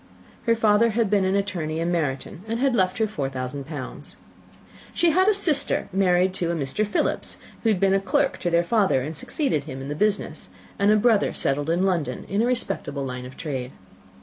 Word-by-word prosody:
Her 230 - +5
father 220 +1 +4
had 225 -2 0
been 200 -2 +3
an 190 +1 +1
attorney 175 -6 -2
in 170 +1 0
Meryton, 155 -1 -2
and 230 +1 -2
had 270 0 +2
left 185 -4 +1
her 220 - +2
four 150 -11 -3
thousand 130 +1 -5
pounds. 145 -5 -7 0.8
She 340 -1 +3
had 370 +4 +3
a 425 - +6
sister 320 -7 +1
married 185 -1 +3
to 175 -3 -1
a - - -1
Mr. 145 +7 -1
Philips, 210 - 0 0.2
who 225 - +2
had 205 -4 +2
been 195 0 +3
a 195 - +4
clerk 270 +8 0
to 175 - -1
their 170 0 +3
father 190 - +2
and 155 +4 -5
succeeded 155 - -1
him 130 - -7
in 135 +1 -6
the - - -2
business, 210 +5 -1 0.3
and 200 +1 +3
a 215 - +6
brother 220 -1 +3
settled 145 +3 -1
in 175 +3 +2
London 180 -6 -1
in 200 +3 0
a 235 - +2
respectable 145 - -2
line 125 -1 -5
of 130 - -13
trade. 130 -5 -4
185 Hz, 210 wpm, -24 LUFS, 145-215 Hz, 0.8 s, a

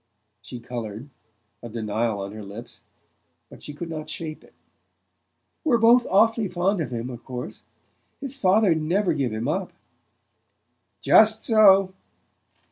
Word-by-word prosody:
She 125 - -9
coloured, 120 +1 -7 0.5
a 120 - -8
denial 110 -1 -2
on 100 0 -6
her 110 0 -9
lips; 105 +4 -10 0.7
but - - -14
she - - -8
could 155 +4 -7
not 155 -2 -6
shape 155 0 -6
it. - - -22 1.1
"We're 275 -7 +3
both 235 +2 +5
awfully 220 +2 +3
fond 180 +1 -1
of 155 - -3
him, 120 +1 -5
of 120 -1 -10
course... 125 -1 -8 0.5
His 275 -1 -6
father'd 190 - +2
never 175 +3 +1
give 135 -6 -1
him 110 +3 -3
up!" 180 +4 -2 1.3
"Just 220 0 +5
so." 195 -4 +5
155 Hz, 135 wpm, -24 LUFS, -, 1.3 s, both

